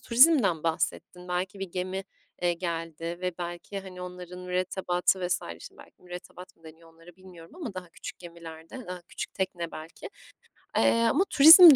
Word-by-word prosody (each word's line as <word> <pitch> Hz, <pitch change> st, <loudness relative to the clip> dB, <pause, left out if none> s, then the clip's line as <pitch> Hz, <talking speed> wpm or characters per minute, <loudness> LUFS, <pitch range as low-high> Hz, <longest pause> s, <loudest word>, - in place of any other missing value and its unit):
turizmden 235 Hz, -, +5 dB
bahsettin. 180 Hz, +2 st, -2 dB
Belki 185 Hz, +3 st, -2 dB
bir 195 Hz, -2 st, -4 dB
gemi, 185 Hz, +1 st, -3 dB, 0.4 s
eee, 175 Hz, 0 st, +3 dB
geldi 165 Hz, -1 st, -4 dB
ve 180 Hz, -1 st, -1 dB
belki, 175 Hz, +3 st, -5 dB
hani, 185 Hz, -1 st, -10 dB
onların 180 Hz, 0 st, -8 dB
mürettebatı 180 Hz, 0 st, 0 dB
vs. 180 Hz, 0 st, +1 dB, 0.2 s
Şimdi -, -, -12 dB
belki -, -, -16 dB
mürettebat 180 Hz, 0 st, -10 dB
mı 165 Hz, -, -29 dB
deniyor 165 Hz, +1 st, -14 dB
onlara 165 Hz, +2 st, -16 dB
bilmiyorum 185 Hz, -, -14 dB
ama 290 Hz, -, -6 dB
daha 180 Hz, -2 st, -6 dB
küçük -, -, -9 dB
gemilerde, 170 Hz, +6 st, -10 dB
daha 180 Hz, -1 st, -6 dB
küçük -, -, -6 dB
tekne, 175 Hz, -3 st, -2 dB
belki. 155 Hz, +1 st, -8 dB, 0.7 s
Eee, -, -, +6 dB, 0.2 s
ama 370 Hz, +7 st, +3 dB
turizm 320 Hz, +2 st, +11 dB
180 Hz, 160 wpm, -28 LUFS, 170-190 Hz, 0.7 s, turizm